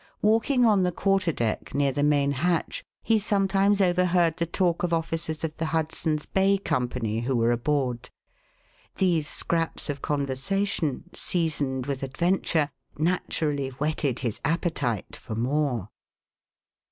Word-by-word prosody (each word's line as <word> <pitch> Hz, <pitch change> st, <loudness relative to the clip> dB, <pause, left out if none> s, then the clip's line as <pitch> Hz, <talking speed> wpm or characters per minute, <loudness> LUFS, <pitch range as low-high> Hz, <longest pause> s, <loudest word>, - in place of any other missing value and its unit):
Walking 230 Hz, +4 st, +3 dB
on 210 Hz, -4 st, +4 dB
the 180 Hz, -1 st, +2 dB
quar 195 Hz, +3 st, +2 dB
ter 180 Hz, -3 st, 0 dB
deck, 115 Hz, -7 st, -2 dB
near 140 Hz, -1 st, +2 dB
the 145 Hz, -, -2 dB
main 145 Hz, -1 st, +3 dB
hatch, 175 Hz, -, -1 dB, 0.2 s
he 225 Hz, -1 st, +3 dB
sometimes 200 Hz, 0 st, +2 dB
overheard 175 Hz, -2 st, +3 dB
the 170 Hz, -1 st, -1 dB
talk 175 Hz, 0 st, +1 dB
of 175 Hz, -, 0 dB
officers 165 Hz, -1 st, -2 dB
of 160 Hz, -1 st, -3 dB
the 160 Hz, -, -1 dB
Hudson's 155 Hz, -1 st, -1 dB
Bay 195 Hz, +1 st, +2 dB
Company, 125 Hz, -, -1 dB
who 125 Hz, +3 st, -1 dB
were 115 Hz, 0 st, +3 dB
aboard. 125 Hz, -1 st, -1 dB, 0.9 s
These 170 Hz, -5 st, +1 dB
scraps 165 Hz, -1 st, -1 dB
of 140 Hz, -1 st, -8 dB
conversation, 145 Hz, +3 st, -1 dB
seasoned 145 Hz, -7 st, -1 dB
with 140 Hz, -2 st, -3 dB
adventure, 155 Hz, +1 st, 0 dB, 0.3 s
naturally 150 Hz, -4 st, 0 dB
whetted 140 Hz, -1 st, -1 dB
his 115 Hz, -5 st, -3 dB
appetite 160 Hz, -, -1 dB
for 110 Hz, -, -7 dB
more. 125 Hz, -3 st, 0 dB
155 Hz, 135 wpm, -26 LUFS, 135-180 Hz, 0.9 s, on